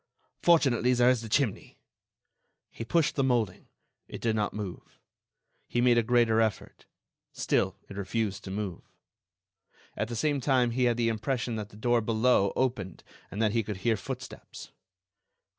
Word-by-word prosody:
Fortunately, 130 -8 +4
there 125 +1 +5
is 125 -3 0
the 115 - -8
chimney." 125 -3 -1 0.9
He - - -7
pushed 160 +7 +1
the 135 - 0
moulding; 120 -8 0 0.4
it - - -8
did 115 -2 0
not 105 -1 0
move. 100 -4 -7 0.7
He 120 - -1
made 120 -1 +4
a - - +4
greater 115 -1 +3
effort—still 105 -2 -3
it 100 - -10
refused 100 0 -2
to - - -6
move. 95 -3 -4 1.1
At 105 - -2
the 120 - -5
same 145 +3 0
time 125 -3 +2
he 125 +1 +1
had 120 -1 +2
the 115 -1 +2
impression 120 +1 -2
that 105 -1 -5
the 105 - -15
door 120 +1 +2
below 110 -2 +2
opened 120 -8 -2 0.3
and 100 - -7
that 105 - +2
he 115 +1 +1
could 105 -2 -5
hear 115 -2 +3
footsteps. 95 - -8
115 Hz, 160 wpm, -28 LUFS, 105-125 Hz, 1.1 s, there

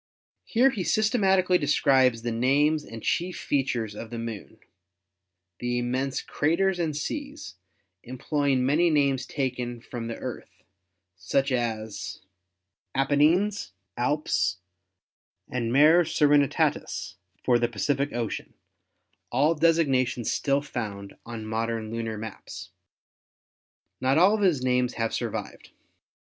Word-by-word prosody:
Here 255 +4 +3
he 215 - -4
sys 215 +4 +1
tematically 190 -5 +3
describes 130 -5 +3
and 115 -1 -2
names 145 +4 +2
the 115 - -7
chief 175 +9 -1
features 125 -6 -1
of 110 +2 -8
the 120 - -6
Moon, 115 -3 -7 1.0
the 120 0 -1
immense 130 +2 -1
craters 180 +5 +1
and 155 -4 -1
seas, 290 - -5 0.5
employing 130 +1 -1
many 160 +6 +3
names 140 -4 +1
taken 125 -3 -3
from 115 -1 -7
the 115 - -4
Earth, - - -8 0.5
such 135 +10 0
as 110 -4 -3 0.7
Apennines, 150 - +2 0.2
Alps, 120 - 0 0.9
and 120 -2 -2
Mare 155 +6 +6
Serenitatis 145 -3 +1 0.3
for 120 -2 +3
the 120 - +2
Pacific 140 +3 -1
Ocean, 115 -2 -4 0.8
all 145 +7 +3
designa 150 -6 +3
tions 120 -1 -3
still 140 0 +1
found 105 -8 -6
on 115 -2 -6
modern 110 0 -2
lunar 115 -1 -3
maps. 95 -3 -8 1.3
Not 130 +2 +2
all 185 +5 +6
of 215 - 0
his 170 -10 +2
names 125 -1 +1
have 115 -1 -1
survived. - - -5
130 Hz, 120 wpm, -26 LUFS, 115-155 Hz, 1.3 s, Mare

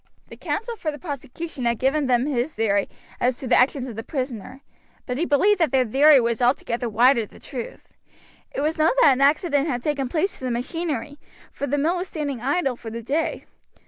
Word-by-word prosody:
The - - -10
counsel 465 +2 -3
for 325 - -3
the 295 - -8
prosecution 290 -2 -6
had 235 -1 +1
given 270 +4 +1
them 245 0 +2
his 280 +1 -1
theory 205 -3 +1 0.3
as 250 0 +1
to 265 - -7
the - - +4
actions 260 0 +2
of 235 - -7
the 225 - -4
prisoner, 255 -1 -5 0.4
but 250 +1 -3
he 340 - +1
believed 390 +8 +3
that 330 - +2
that 255 -3 +2
theory 285 +2 +7
was 235 0 0
altogether 245 -1 0
wide 240 +4 +4
of 215 - -4
the - - -16
truth. 245 -4 -8 0.6
It - - -3
was 310 +2 -1
known 315 +6 +4
that 285 - +7
an 260 - -2
accident 290 +1 +3
had 245 -5 -2
taken 285 -3 -1
place 340 +7 -1
to - - -13
the 255 - -1
machinery, 285 +2 -3 0.3
for 285 - -4
the 290 - 0
mill 325 +5 +1
was 360 +2 -3
standing 285 -8 -4
idle 275 0 0
for 230 - -9
the 230 +1 -6
day. 295 +7 -2
270 Hz, 215 wpm, -23 LUFS, 245-305 Hz, 0.6 s, theory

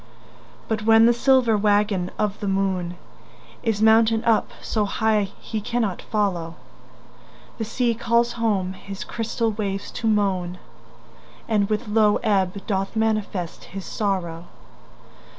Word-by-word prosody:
But 220 -1 -1
when 225 +1 +6
the 240 - +5
silver 245 -2 +3
waggon 205 -3 +2
of 210 -1 -1
the 205 - -3
moon 190 -3 -1 0.7
Is 220 -1 0
mounted 225 0 +4
up 225 -2 +3
so 215 -2 -1
high 210 -1 +1
he 220 - -4
cannot 220 -3 -1
follow, 180 -6 -1 1.0
The 225 - -1
sea 235 +2 0
calls 235 +1 +1
home 205 -6 -1
his 195 +1 -8
crystal 230 0 -2
waves 200 -2 -4
to 225 - -3
moan, 190 -4 0 0.9
And 210 -3 +1
with 215 +2 -1
low 210 -1 +3
ebb 195 -2 0
doth 195 0 -2
manifest 215 -5 -1
his 195 0 -8
sorrow. 175 -5 -2
210 Hz, 130 wpm, -23 LUFS, 195-225 Hz, 1.0 s, when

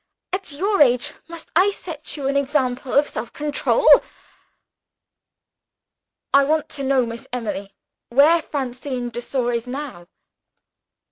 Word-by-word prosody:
At 375 -3 -3
your 390 +5 +1
age, 245 -3 +4
must 335 -1 -10
I 370 +4 +5
set 325 -6 -7
you 275 -2 -3
an 275 - 0
example 265 -2 0
of 290 +1 +4
self 225 +1 -6
control? 300 - 0 2.5
"I 280 - +7
want 310 +2 0
to 275 - -5
know, 265 -2 +2
Miss 230 0 -7
Emily, 200 -5 -4 0.3
where 300 +7 +5
Francine 255 -3 -4
de 240 - -5
Sor 245 -1 -1
is 235 +1 -3
now?" 255 -10 -6
275 Hz, 130 wpm, -21 LUFS, 245-300 Hz, 2.5 s, I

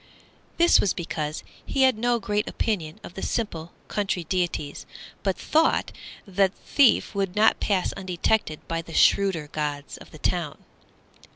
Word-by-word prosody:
This 340 0 +6
was 195 - +1
because 155 -3 -4 0.2
he 270 - +1
had 260 -2 +5
no 240 +2 +1
great 210 0 -1
opinion 170 -9 -2
of - - -9
the 190 - -7
simple 175 -7 -3 0.2
country 195 -4 -1
deities, 170 -4 -2 0.3
but 195 -2 -1
thought 320 +1 +2 0.3
that 195 -1 +1
the - - -28
thief 275 -6 +3
would 195 -2 -2
not 215 +1 +4
pass 195 -3 0
undetected 185 -2 -1
by 165 0 -2
the 165 0 -10
shrewder 190 -6 +3
gods 145 -2 -4
of - - -14
the - - -12
town. - - -1
190 Hz, 155 wpm, -25 LUFS, 165-215 Hz, 0.3 s, This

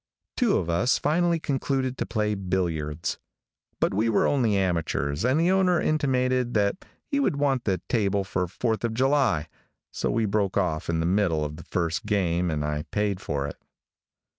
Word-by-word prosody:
Two 235 -5 +2
of 85 - -2
us 85 +9 +2
finally 170 +3 +1
concluded 135 -3 -1
to - - -2
play 105 -2 0
billiards; 85 -6 -2 0.6
but - - +1
we 110 +4 +1
were 110 - +3
only 115 -8 +2
amateurs 85 -5 -1
and 130 +5 +2
the 170 +3 +3
owner 185 -2 +3
intimated 130 -5 +1
that 105 - +1 0.2
he 280 -2 -1
would 275 - +1
want 140 -3 0
the 95 -4 0
table 100 -4 +1
for 90 -1 -2
Fourth 110 +5 -2
of 115 -1 -1
July, 130 - +2 0.4
so - - -2
we 115 0 +1
broke 100 -2 0
off 85 -4 -1
in 80 -1 +1
the - - 0
middle 90 -4 +1
of 75 +1 -5
the 80 - -10
first 85 +2 -2
game 90 -4 +1
and 75 -2 -1
I 75 0 -1
paid 105 -3 -1
for 70 -1 -2
it. 70 - -8
105 Hz, 180 wpm, -26 LUFS, 85-130 Hz, 0.6 s, were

